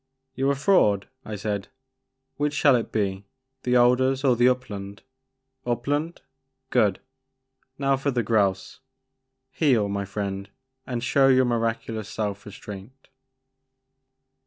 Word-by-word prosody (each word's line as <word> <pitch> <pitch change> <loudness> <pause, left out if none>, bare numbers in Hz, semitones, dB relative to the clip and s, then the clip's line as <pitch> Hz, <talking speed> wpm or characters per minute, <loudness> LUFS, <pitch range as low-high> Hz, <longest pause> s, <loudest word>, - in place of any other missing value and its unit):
You 135 +1 0
're - - +3
a - - -3
fraud," 135 - +3 0.2
I 105 - -6
said; 100 -1 -3 0.7
which 145 0 -1
shall 145 -2 +5
it 115 - -2
be, 100 -2 -2 0.3
the 125 0 +1
alders 130 +2 +3
or 130 -3 +4
the 120 +2 +5
upland? 100 -6 -4 0.6
Upland? 145 +7 -2 0.5
Good! 105 -6 +3 0.4
— 130 - -55 0.3
now 135 -1 +2
for 135 +2 -1
the 120 -3 0
grouse, 100 -3 0 0.4
— 130 - -54 0.3
heel, 125 -10 +2
my 100 0 -2
friend, 100 0 -4 0.4
and 120 -2 -3
show 135 +2 +4
your 130 -1 +5
miraculous 115 -2 -2
self 105 -2 -4
restraint." 105 +5 -11
120 Hz, 135 wpm, -25 LUFS, 100-130 Hz, 0.7 s, shall